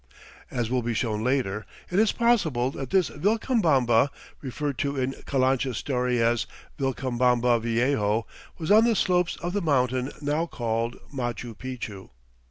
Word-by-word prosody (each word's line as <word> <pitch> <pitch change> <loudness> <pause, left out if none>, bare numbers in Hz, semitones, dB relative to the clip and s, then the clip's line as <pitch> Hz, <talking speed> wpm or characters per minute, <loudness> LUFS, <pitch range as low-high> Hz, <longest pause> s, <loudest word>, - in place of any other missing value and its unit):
As 120 -2 -2
will 130 -1 +1
be 120 -1 -2
shown 110 -2 -1
later, 120 -5 0 0.3
it 180 - +2
is 220 -1 +4
possible 165 - +2
that 135 -2 -6
this 185 -5 +2
Vilcabamba, 155 - +2 0.3
referred 140 +1 -3
to 140 0 -1
in 130 0 0
Calancha's 130 -2 +1
story 125 -2 0
as 115 0 +2 0.3
"Vilcabamba 125 -3 +1
Viejo," 115 -2 +1 0.3
was 165 +3 -2
on 215 +2 +7
the 235 -1 +3
slopes 180 -3 +2
of 175 +1 -2
the 205 - 0
mountain 130 -4 +1
now 150 +3 -1
called 115 -3 -2 0.2
Machu 120 -2 -4
Picchu. 115 -5 -7
130 Hz, 145 wpm, -26 LUFS, 120-150 Hz, 0.3 s, on